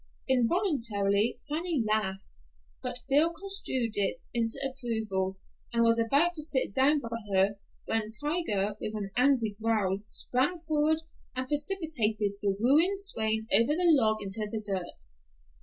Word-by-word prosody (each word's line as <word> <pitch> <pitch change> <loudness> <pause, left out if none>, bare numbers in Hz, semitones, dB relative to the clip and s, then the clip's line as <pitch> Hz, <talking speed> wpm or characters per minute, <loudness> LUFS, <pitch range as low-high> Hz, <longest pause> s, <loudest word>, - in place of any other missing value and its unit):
Involuntarily 230 - +1
Fanny 315 -3 -1
laughed, 195 - -2 0.4
but 245 - -4
Bill 295 +4 +4
construed 335 - -2
it 205 +5 +1
into 230 -1 0
approval, 220 -7 -3 0.3
and 235 -1 +2
was 230 0 +3
about 280 +10 +3
to 315 - -3
sit 280 -9 -1
down 285 +4 +3
by 230 -2 -5
her, 195 +1 +2 0.3
when 225 -1 +2
Tiger, 220 - -1
with 215 - -4
an 200 -2 -5
angry 245 -5 +2
growl, 210 -4 0
sprang 265 +10 -1
forward 310 +1 +1 0.3
and 255 0 -3
precipitated 290 - 0
the 200 -1 0
wooing 305 - +4
swain 220 - -1
over 235 +7 +6
the 345 -1 +4
log 220 -6 +2
into 205 +2 -4
the 220 - -4
dirt. 185 - -5
230 Hz, 140 wpm, -29 LUFS, 210-295 Hz, 0.4 s, over